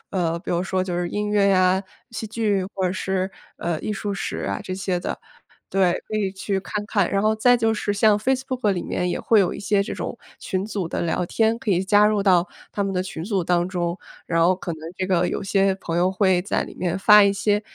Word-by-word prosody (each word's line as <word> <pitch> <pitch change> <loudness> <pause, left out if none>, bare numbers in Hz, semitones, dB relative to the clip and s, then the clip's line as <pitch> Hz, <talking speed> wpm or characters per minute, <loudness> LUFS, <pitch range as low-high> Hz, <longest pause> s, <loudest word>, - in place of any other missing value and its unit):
呃， 170 -3 0
比 - - -6
如 175 +1 0
说 190 0 0
就 180 -2 -3
是 175 - -1
音 210 +3 -2
乐 200 -1 +3
呀， 185 0 +3 0.3
戏 225 -1 -5
剧 210 -3 0
或 190 - -1
者 180 - +1
是， 190 0 -2 0.3
呃， 170 -2 -2
艺 215 - -3
术 205 0 -3
史 140 - -4
啊 100 - -2
这 185 - -5
些 185 -2 -1
的。 - - -5 0.5
对， 190 -2 +2
可 215 - -3
以 200 -3 0
去 190 0 -2
看 - - -12
看。 200 -5 +1
然 195 - +1
后 215 +1 +2
再 245 +3 +4
就 225 -1 +1
是 205 - -1
像 205 +1 +4
Facebook 255 0 0
里 185 -3 -1
面 180 0 -1
也 - - -2
会 220 -2 +4
有 185 - +1
一 - - -7
些 205 0 +1
这 200 - -5
种 - - -5 0.2
群 190 -1 -3
组 200 -4 -3
的 - - -3
聊 170 +1 -1
天， 225 +4 +1
可 225 -5 -1
以 180 - +1
加 205 +1 +5
入 210 -1 +1
到 180 -2 +3 0.2
他 200 - -2
们 195 - -2
的 180 - 0
群 175 -3 -6
组 195 -3 0
当 175 +1 +1
中。 175 -1 -2 0.3
然 165 -1 +1
后 175 +3 +4
可 185 -1 -6
能 160 - -8 0.2
这 185 - -2
个 180 -2 +2
有 - - -3
些 195 -1 +2
朋 170 -3 -4
友 180 +1 +3
会 190 -2 +2
在 190 - -1
里 - - -9
面 180 0 -1
发 210 +1 +7
一 200 - +3
些， 205 +1 +1
195 Hz, 285 characters per minute, -23 LUFS, 180-210 Hz, 0.5 s, 发